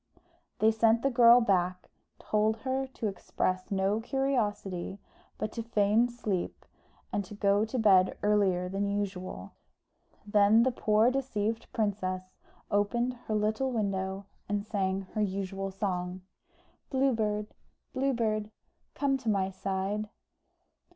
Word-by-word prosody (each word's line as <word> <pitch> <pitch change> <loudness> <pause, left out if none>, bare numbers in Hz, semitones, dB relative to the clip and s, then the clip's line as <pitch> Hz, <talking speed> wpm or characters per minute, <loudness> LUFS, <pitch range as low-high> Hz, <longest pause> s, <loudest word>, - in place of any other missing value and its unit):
They 220 +1 +4
sent 225 +1 +3
the 275 - +2
girl 240 0 +7
back, 185 -4 0 0.3
told 215 +1 +1
her 265 0 -1
to 245 -4 -4
express 185 -1 -2
no 195 +2 +1
curiosity, 210 -9 -1 0.4
but 215 - -3
to 230 - -4
feign 225 +1 +2
sleep, 210 -7 -3 0.5
and 205 - 0
to 200 +2 -10
go 200 +1 +2
to 225 +4 -4
bed 190 -5 +4
earlier 195 -4 +2
than 195 +2 -1
usual. 195 -2 -4 0.7
Then 210 +2 +5
the 260 - +2
poor 220 0 +3
deceived 225 -5 -2
princess 185 -4 -2 0.4
opened 235 +5 +1
her 215 - 0
little 215 +5 0
window, 195 -3 -2 0.2
and 205 0 -1
sang 195 -3 -1
her 215 - -1
usual 195 -1 -2
song 185 -2 -3 0.7
"Blue 270 0 +2
Bird, 210 -1 -2 0.4
Blue 270 +1 +1
Bird, 215 -2 -1 0.5
Come 275 -1 +1
to 240 -4 -2
my 195 -2 +1
side." 195 +2 -2
210 Hz, 130 wpm, -30 LUFS, 195-230 Hz, 0.7 s, girl